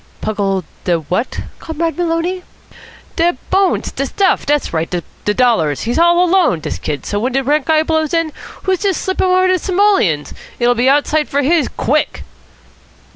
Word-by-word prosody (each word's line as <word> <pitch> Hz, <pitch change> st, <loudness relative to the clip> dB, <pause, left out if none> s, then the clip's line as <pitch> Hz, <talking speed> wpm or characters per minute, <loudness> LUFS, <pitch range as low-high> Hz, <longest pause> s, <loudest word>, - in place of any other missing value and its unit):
"Pungle 195 Hz, -3 st, -1 dB, 0.2 s
de 175 Hz, -1 st, +2 dB
what, 180 Hz, -, -3 dB, 0.2 s
Comrade 325 Hz, 0 st, -3 dB
Maloney?" 345 Hz, +1 st, -1 dB, 0.8 s
"De 345 Hz, +1 st, +2 dB
bones. 385 Hz, 0 st, +1 dB
De 275 Hz, -, -3 dB
stuff. 390 Hz, +4 st, +1 dB
Dat's 295 Hz, -7 st, 0 dB
right. 160 Hz, 0 st, -1 dB
De 180 Hz, +4 st, -4 dB
dollars. 220 Hz, -, +2 dB
He's 240 Hz, +6 st, -1 dB
all 345 Hz, +1 st, +5 dB
alone, 350 Hz, -, +3 dB
dis -, -, -5 dB
kid, 145 Hz, -2 st, -4 dB
so 205 Hz, -, -2 dB
when 245 Hz, +4 st, -1 dB
de 270 Hz, +1 st, +1 dB
rent 290 Hz, +1 st, +1 dB
guy 315 Hz, -1 st, +3 dB
blows 315 Hz, -1 st, 0 dB
in, 330 Hz, -2 st, 0 dB, 0.3 s
who's 380 Hz, -2 st, 0 dB
to 395 Hz, -3 st, 0 dB
slip 375 Hz, +3 st, -2 dB
him -, -, +3 dB
over 370 Hz, 0 st, +3 dB
de 370 Hz, 0 st, +2 dB
simoleons? 370 Hz, -, +1 dB, 0.2 s
It'll 240 Hz, 0 st, +3 dB
be 245 Hz, +2 st, +2 dB
outside 295 Hz, +2 st, +2 dB
for 285 Hz, +1 st, 0 dB
his, 310 Hz, -1 st, +2 dB
quick." 300 Hz, +4 st, -1 dB
300 Hz, 175 wpm, -16 LUFS, 225-345 Hz, 0.8 s, all